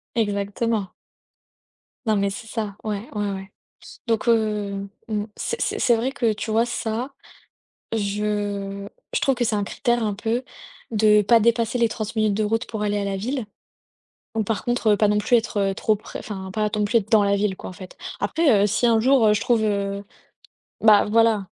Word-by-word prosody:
exactement. 205 -1 -1 1.2
Non, 220 -1 +2
mais 200 0 +1
c'est 225 +4 -7
ça. 215 -3 -4
Ouais, 215 +1 -3
ouais, 205 -1 -1
ouais, 195 0 -7 0.6
donc, 225 0 0
heu, 210 -3 +1 0.2
mmh, 210 -2 -2
c'est 465 - -3
c'est - - -1
c'est 240 -2 +4
vrai 240 +4 -1
que, 230 -5 +1
tu 215 +1 -5
vois 225 +2 +3
ça, 240 +2 -3 0.8
je 205 -1 -2 0.3
je - - +2
trouve 275 -2 +2
que 245 - 0
c'est 225 -2 +1
un 205 - 0
critère 240 +3 0
un 210 -1 0
peu. 225 +5 -2 0.5
De 210 -1 +5
pas 230 +3 +4
dépasser 230 +1 +2
les 235 -1 +3
30 215 0 -5
minutes 215 -2 +2
de 215 +2 0
route 225 +3 0
pour 215 -2 -5
aller 205 0 0
à 205 - -1
la 200 -1 -2
ville, 250 +4 -3 0.9
bon 225 - +1
par 210 -1 -2
contre, 240 -3 +2
pas 210 - +3
non 210 0 +2
plus 210 +4 +3
être 205 -4 0
trop 215 +2 +1
prè 210 - -8
enfin, 190 -3 -6
ne - - -7
pas 210 +2 -1
non 210 -1 +1
plus 230 +3 +1
être 215 0 -7
dans 220 -3 +6
la 200 0 +2
ville 200 -1 0
quoi - - -7
en - - -9
fait. 185 0 -11 0.2
Après, 275 -12 +3
heu, - - +4
si 220 +4 +1
un 230 -1 +4
jour 235 -3 +4
je 210 - 0
trouve, 235 -3 +2
heu, 200 -1 -1 0.8
bah 215 -2 +6
voilà. 225 -3 +3
215 Hz, 200 wpm, -23 LUFS, 205-230 Hz, 1.2 s, dans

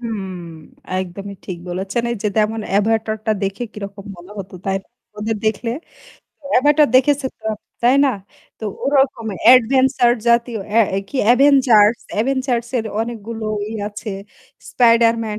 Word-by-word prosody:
হুম, 215 -5 -5 0.7
একদমই 195 +2 -6
ঠিক 180 -2 -5
বলেছেন। 190 +6 -2
এই 235 - -2
যে 210 - +1
যেমন 220 +1 +1
'Avatar' 220 +2 +1
টা 220 - +3
দেখে 195 +4 -2
কিরকম 200 -1 -8
মনে 175 +3 -14
হতো 190 -1 -8
তাই 195 0 0
না? - - -35 0.3
ওদের 220 +1 -2
দেখলে। 220 +2 -1 0.8
'Avatar' 295 +3 +4
দেখেছো 275 +1 +3
তো, - - -25 0.4
তাই 245 +2 +5
না? 275 - +3 0.5
তো - - -7 0.2
ওরকম 270 -5 +1 0.3
adventure 255 0 +4
জাতীয়, 235 -1 +2
এ্যা 230 +1 +5 0.3
কি - - -6 0.2
Avengers, 245 -5 +5 0.2
Avengers 255 -2 -1
এর 225 - -3
অনেকগুলো 225 -1 -5 0.3
ই - - -5 0.2
আছে। 210 +1 -7 0.6
Spider-Man 230 -2 +3
225 Hz, 135 wpm, -19 LUFS, 210-250 Hz, 0.8 s, তাই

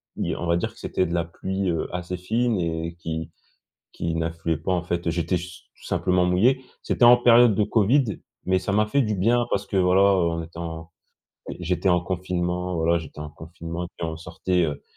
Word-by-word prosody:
dire - - -2
on - - -2
va 85 0 +3
dire - - -2
que - - -18
c'était 95 - -1
de 85 - -4
la 85 -1 +1
pluie, 95 +3 -3
heu, 80 -2 -1
assez 90 0 -4
fine 110 +4 0
et 85 0 -2
qui 80 -1 -5 0.6
qui 85 -1 -3
n'affluait 80 0 -1
pas 80 +5 -2
en 90 -2 0
fait, 85 -1 -2
j'étais 85 +2 0
su 90 +1 -7 0.2
simplement 90 -1 +1
mouillé. 105 +9 +3 0.2
C'était - - +2
en 120 +1 +9
période 120 -2 +6
de 105 - +2
COVID, 110 +6 +3 0.4
mais 95 0 +2
ça 95 +2 -3
m'a 105 +1 +3
fait 140 +6 +2
du 105 -3 -1
bien 115 +5 +2
parce - - -1
que 100 - -2
voilà, 90 0 +4
heu, 95 -4 +4
on 85 0 -3
était 85 +1 -11
en 80 -1 -6 0.7
j'étais 90 +2 0
en 90 -1 +4
confinement, 90 0 -2
voilà 85 +1 +2
j'étais 80 -2 -11
en 75 - -5
confinement 85 +2 -7
et - - -7
puis 85 - -2
on 80 0 -5
sortait, 85 +2 -1
heu 75 -3 -3
90 Hz, 210 wpm, -24 LUFS, 85-95 Hz, 0.7 s, en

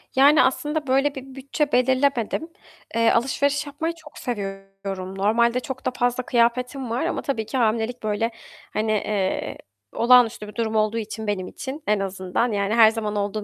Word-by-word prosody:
Yani, 285 +3 +6
aslında 295 +3 -1
böyle 275 +2 +2
bir 265 0 -9
bütçe 280 +2 -2
belirlemedim. 260 +2 +1 0.5
Eee, 230 0 +4
alışveriş 280 +4 +1
yapmayı 315 +4 -3
çok 315 -2 -15
seviyorum. 195 -3 -5
Normalde 235 +5 +2
çok 260 +1 -7
da - - +1
fazla 245 0 0
kıyafetim 250 +2 +1
var 235 +3 -1
ama - - -1
tabii 230 -6 -2
ki 220 +5 -3
hamilelik 230 +1 0
böyle, 215 +2 0 0.4
hani, 215 +1 0
eee, 205 -2 -1 0.4
olağanüstü 235 -3 +4
bir 210 - -11
durum 225 -2 -1
olduğu 215 +1 +2
için 220 0 -5
benim 190 -3 -2
için 280 +3 -7
en 210 0 +2
azından, 195 +4 -1
yani, 200 0 0
her 225 -2 +8
zaman 215 -2 -3
olduğum 205 +1 -2
235 Hz, 165 wpm, -23 LUFS, 210-265 Hz, 0.5 s, her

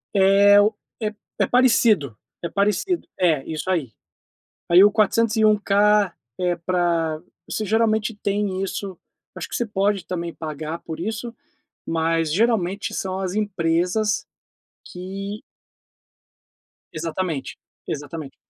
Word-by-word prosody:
É 200 +1 +6
o 215 +2 +2 0.3
é 215 0 -1 0.3
é - - +4
parecido 225 - +3 0.3
é 170 - -2
parecido. 210 - 0
É, 160 -7 +2
isso 160 +3 -4
aí. 155 -11 0 0.8
Aí 175 +2 +7
o 205 - +7
401k 210 -2 +3 0.3
é 175 -1 +1
pra 170 -2 0 0.3
você 215 - -2
geralmente 220 0 +1
tem 200 -2 -1
isso, 195 -1 -4 0.4
acho - - -5
que - - -8
você 240 - -1
pode 200 -2 0
também 170 -2 -4
pagar 155 +1 -5
por 160 -1 -7
isso, 225 +5 -4 0.5
mas 165 -1 0
geralmente 205 -2 +1
são 190 0 -3
as 190 0 -3
empresas 190 +1 0 0.6
que 195 +3 -6 1.5
Exatamente, 160 -3 -3 0.3
exatamente. 145 0 -6
190 Hz, 115 wpm, -22 LUFS, 165-210 Hz, 1.5 s, Aí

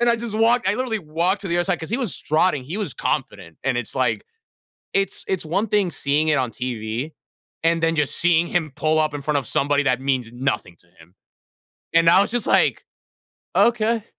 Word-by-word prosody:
and 240 - +3
I 235 - +4
just 230 -2 -5
walked 230 0 +3
I, 200 - +2
literally, 240 -3 -1
walked 170 +4 0
to 195 - -5
the 170 - 0
other 175 - +1
side, 180 -2 -1
'cause 160 - -6
he 235 - +1
was 240 -9 -1
strutting, 155 -2 +1
he 160 +9 -5
was 200 - -3
confident, 85 -1 -3
and 135 -2 +1
it's 120 - -4
like 125 -5 0 0.7
it's 195 -1 0
it's 190 -3 -1
one 195 +8 -1
thing 200 -3 +2
seeing 150 0 0
it 150 - +3
on 130 -3 0
TV 120 +3 -4 0.5
and 165 0 +2
then 165 0 +2
just 150 -3 0
seeing 170 0 +3
him 160 -6 -1
pull 155 0 +1
up 155 -1 +1
in 145 - -5
front 150 0 +1
of 135 - -5
somebody 145 +1 +1
that 125 -2 +1
means 130 -4 -1
nothing 120 -8 -2
to 85 - -18
him. 80 +3 -19 0.8
And, 165 0 +5
I 185 - +6
was - - -2
just 240 -2 -1
like, - - +2 0.7
"Okay." 230 -1 +2
160 Hz, 215 wpm, -22 LUFS, 135-195 Hz, 0.8 s, I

